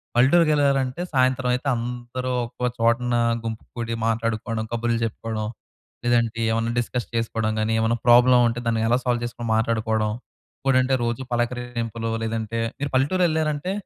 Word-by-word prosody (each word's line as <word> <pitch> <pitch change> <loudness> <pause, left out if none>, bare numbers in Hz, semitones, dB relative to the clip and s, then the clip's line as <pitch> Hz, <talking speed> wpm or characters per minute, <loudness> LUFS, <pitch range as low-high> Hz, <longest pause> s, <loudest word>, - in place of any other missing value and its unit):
పల్లెటూరికేళ్లారంటే, 140 0 +3
సాయంత్రం 130 -1 +2
అయితే 130 +3 -5
అందరూ 120 +2 -4 0.2
ఒక 125 +1 -3
చోటున 120 +1 +2 0.3
గుంపు 110 0 -5
కుడి 115 -1 -3
మాట్లాడుకోవడం, 115 0 -1
కబుర్లు 120 0 0
జెప్పుకోవడం, 110 -1 -3 0.6
లేదంటే 115 -1 +1
ఏమన్నా 115 +1 0
డిస్కస్ 120 0 -3
చేసుకోవడం 110 -1 -1
గాని, 110 +1 0
ఏమన్నా 115 +1 +1
ప్రాబ్లమ్ 125 +1 +7
ఉంటే 115 +1 -2
దాన్ని 115 -1 +1
ఎలా 120 - +3
సాల్వ్ 120 -2 0
జేసుకొని 120 -1 -5
మాట్లాడుకోవడం. 110 -1 0 0.5
ఇంకటేంటంటే 130 -1 +2
రోజు 120 +2 -2
పలకరింపులు 120 -1 -2
లేదంటే 115 0 -3 0.2
మీరు 145 - -2
పల్లెటూరేళ్లారంటే 155 +2 +1
120 Hz, 130 wpm, -23 LUFS, 115-130 Hz, 0.6 s, ప్రాబ్లమ్